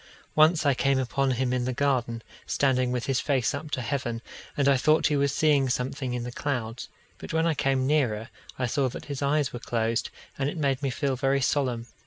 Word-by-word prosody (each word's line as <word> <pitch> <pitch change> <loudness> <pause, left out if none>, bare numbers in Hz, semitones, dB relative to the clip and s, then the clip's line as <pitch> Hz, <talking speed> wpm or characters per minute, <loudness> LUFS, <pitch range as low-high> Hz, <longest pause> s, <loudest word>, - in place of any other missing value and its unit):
Once 155 +1 +4
I 140 - +5
came 135 +1 +2
upon 135 +1 0
him 125 0 0
in 125 -1 0
the 130 - -1
garden, 120 -4 0 0.2
standing 130 -2 +1
with 125 -1 -2
his 135 -1 +1
face 135 -5 +1
up 145 +2 -5
to 130 -4 -2
heaven, 120 -4 -3 0.3
and 140 -1 +2
I 140 - +6
thought 155 +5 +3
he 150 - +3
was 140 -1 +2
seeing 140 -2 +3
something 125 0 -2
in 120 - -3
the 125 - -5
clouds; 120 -3 -3 0.3
but - - -7
when 160 0 +2
I 165 - +2
came 135 -2 +1
nearer, 125 -7 +1 0.3
I 130 - 0
saw 130 +2 +1
that - - -8
his 140 0 -5
eyes 140 0 +1
were 120 - -5
closed, 115 0 -1 0.3
and 135 0 +1
it 170 - -6
made 140 -3 0
me 140 - 0
feel 135 +1 -1
very 135 +2 +1
solemn. 130 -3 0
135 Hz, 220 wpm, -27 LUFS, 125-140 Hz, 0.3 s, I